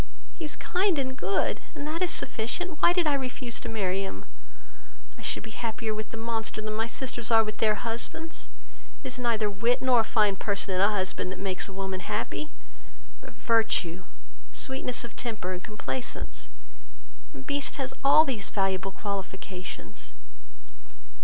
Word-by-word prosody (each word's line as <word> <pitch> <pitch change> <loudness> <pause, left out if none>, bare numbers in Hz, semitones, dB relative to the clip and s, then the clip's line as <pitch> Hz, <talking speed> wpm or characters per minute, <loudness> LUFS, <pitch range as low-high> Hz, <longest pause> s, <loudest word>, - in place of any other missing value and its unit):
He - - -6
is 300 - -1
kind 365 -1 +2
and 260 -1 0
good, 195 -1 +1
and 285 - -4
that 320 +3 -2
is 365 - +3
sufficient. 305 +10 0
Why - - +8
did 355 -1 +3
I 300 - +4
refuse 255 -3 -2
to - - -5
marry 195 -4 0
him? 105 - -5 0.9
I - - -13
should - - 0
be 220 - -8
happier 225 0 -2
with 215 0 -4
the 225 - -7
monster 225 -1 -2
than 215 0 -3
my 225 +1 0
sisters 240 -1 -3
are 225 -1 +7
with 215 -1 -5
their 215 -1 +4
husbands; 235 +9 -3 0.6
it - - -3
is 255 0 -2
neither 230 -3 +2
wit 230 +5 +2
nor 255 -2 +5
a - - +5
fine 210 -3 +3
person 200 -1 +1
in 185 - +2
a 200 - +6
husband, 190 -2 0
that 185 - -5
makes 190 0 -2
a - - -8
woman 190 -1 -2
happy; 300 - -2 0.7
but - - -11
virtue, 190 -6 +2 0.5
sweetness 250 - +1
of 235 - -8
temper, 215 -6 -3
and 180 - -5
complaisance: 130 - -3 0.8
and 130 0 -10
Beast 285 -1 0
has 265 -2 -2
all 285 +3 +8
these 240 -8 -1
valuable 195 -1 +1
qualifications. 185 - -6
220 Hz, 170 wpm, -29 LUFS, 195-255 Hz, 0.9 s, Why